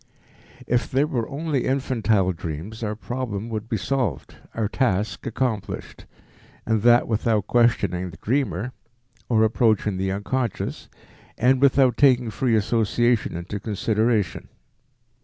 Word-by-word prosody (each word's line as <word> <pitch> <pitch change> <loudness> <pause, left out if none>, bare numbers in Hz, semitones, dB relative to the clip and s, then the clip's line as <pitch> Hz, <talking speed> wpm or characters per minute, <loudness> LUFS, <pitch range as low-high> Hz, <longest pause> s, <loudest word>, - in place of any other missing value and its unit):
If 120 0 0
there 135 +3 +2
were 120 -7 -2
only 145 -2 -2
infantile 115 -8 +1
dreams, 85 +7 -6
our 105 -1 -2
problem 115 -2 -4
would 110 0 -5
be 110 - 0
solved, 115 - -2 0.2
our 110 -2 0
task 105 -3 -1
accomplished, 115 -3 -3 0.6
and 110 -1 +1
that 120 +1 +5
without 110 -2 +1
questioning 100 -7 +1
the - - -12
dreamer, 120 -3 -1 0.6
or 110 -2 +4
approaching 110 -3 +2
the 95 0 -1
unconscious, 115 +3 -3 0.5
and 130 +2 +3
without 135 -3 +4
taking 125 -5 +4
free 120 0 +1
association 115 +1 +1
into 95 +4 -5
consideration. 110 -1 0
115 Hz, 120 wpm, -23 LUFS, 105-125 Hz, 0.6 s, that